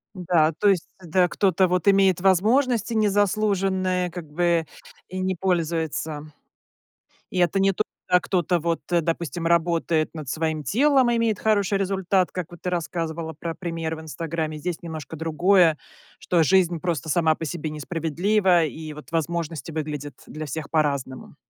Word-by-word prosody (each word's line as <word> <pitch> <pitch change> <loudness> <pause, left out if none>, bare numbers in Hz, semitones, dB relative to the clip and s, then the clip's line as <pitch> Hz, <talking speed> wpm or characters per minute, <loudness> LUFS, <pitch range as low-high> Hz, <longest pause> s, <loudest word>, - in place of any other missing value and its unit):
Да, 170 -3 +2
то 205 - +4
есть 185 -4 +1
зд 180 +1 +2
кто-то 190 0 +2
вот 180 0 -1
имеет 195 -2 +4
возможности 225 +5 +2
незаслуженные, 195 -3 +1
как 165 -4 -8
бы, 170 0 +1 0.4
и 185 - -5
не 185 0 -1
пользуется. 160 -4 -2 1.1
И 185 - 0
это 175 +2 +2
не 195 0 +4
то, 215 - -1 0.3
а 180 - +5
кто-то 175 -2 0
вот, 170 +1 -1
э, 170 -1 +3
допустим, 165 +1 -2
работает 170 -2 +1
над 155 -5 -7
своим 155 +1 -2
телом 260 - +3
и 235 - +2
имеет 225 -3 +1
хороший 205 -2 +1
результат, 190 -1 +1
как 180 -2 -5
вот 175 - -11
ты 180 - -2
рассказывала 165 -2 -3
про 165 +2 -5
пример 165 -2 -4
в 160 - -9
"Инстаграме", 155 0 -4
здесь 175 +1 -4
немножко 160 -2 -7
другое, 165 +1 +3 0.4
что 170 -2 +2
жизнь 175 0 +3
просто 160 -3 -2
сама 160 0 +3
по 160 - -6
себе 155 0 -4
несправедлива, 170 +4 +1
и 155 0 -7
вот 150 +1 -12
возможности 165 -2 -2
выглядят 150 -2 -4
для 155 0 -6
всех 145 +1 -5
по-разному. 140 -4 -1
170 Hz, 155 wpm, -24 LUFS, 160-190 Hz, 1.1 s, а